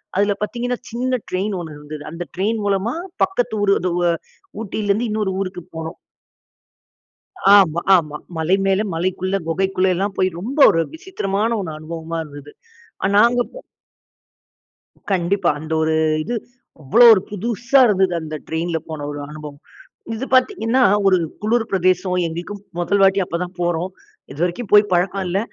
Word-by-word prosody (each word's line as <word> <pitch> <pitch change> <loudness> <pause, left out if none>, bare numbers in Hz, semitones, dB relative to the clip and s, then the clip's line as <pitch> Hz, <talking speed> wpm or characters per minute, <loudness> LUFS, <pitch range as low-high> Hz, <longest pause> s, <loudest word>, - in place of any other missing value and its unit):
அதுல 205 +1 +2
பார்த்தீங்கன்னா, 245 +3 -2
சின்ன 250 +2 -1
ட்ரெயின் 195 +3 -1
ஒண்ணு 160 -3 -7
இருந்தது. 150 0 -9
அந்த 170 +1 -5
ட்ரெயின் 215 +4 0
மூலமா 200 +4 0 0.3
பக்கத்து 245 -12 0
ஊரு 200 -1 +4
அது 180 - -1
வ 175 -1 +2 0.5
ஊட்டியிலேருந்து 215 +2 -1
இன்னொரு 210 -3 -1
ஊருக்கு 185 -2 -4
போனோம். 160 0 -6 1.6
ஆமா, 170 -4 +4 0.2
ஆமா. 150 -3 -2 0.2
மலை 165 +4 +2
மேல, 195 0 +2
மலைக்குள்ள, 185 +3 -1
குகைக்குள்ளல்லாம் 190 +2 0
போய் 185 - +3
ரொம்ப 260 +10 -5
ஒரு 165 0 +2
விசித்திரமான 225 - -2
ஒண்ணு 160 -5 -5
அனுபவமா 165 +1 -6
இருந்தது. 145 -1 -12 0.5
அ - - +4
நாங்க 235 +3 +5
அப்போ - - -12 1.5
கண்டிப்பா. 185 +1 +1
அந்த 160 +1 -7
ஒரு 160 0 +1 0.3
இது, 240 - -3 0.5
அவ்வளோ 230 - +5
ஒரு 190 - 0
புதுசா 235 +6 +1
இருந்தது 190 -3 +2
அந்த 155 0 -6
ட்ரெயின்ல 165 +1 -1
போன 150 -2 -5
ஒரு 145 - -6
அனுபவம். 150 -1 -9 0.5
இது 230 +4 -4
பார்த்தீங்கன்னா, 255 - +2 0.2
ஒரு 190 - +5 0.3
குளுர் 225 +2 +1
பிரதேசம், 185 0 +1
எங்களுக்கும் 175 +5 -6 0.2
மொதல் 175 +3 +1
வாட்டி 195 0 +4
அப்ப 170 - -3
தான் 180 +1 -6
போறோம். 175 +1 -1 0.4
இது 140 - -12
வரைக்கும் 185 +5 -4
போய் 210 0 +8
பழக்கம் 190 +2 +1
இல்ல. 180 +2 0
190 Hz, 145 wpm, -20 LUFS, 165-210 Hz, 1.6 s, போய்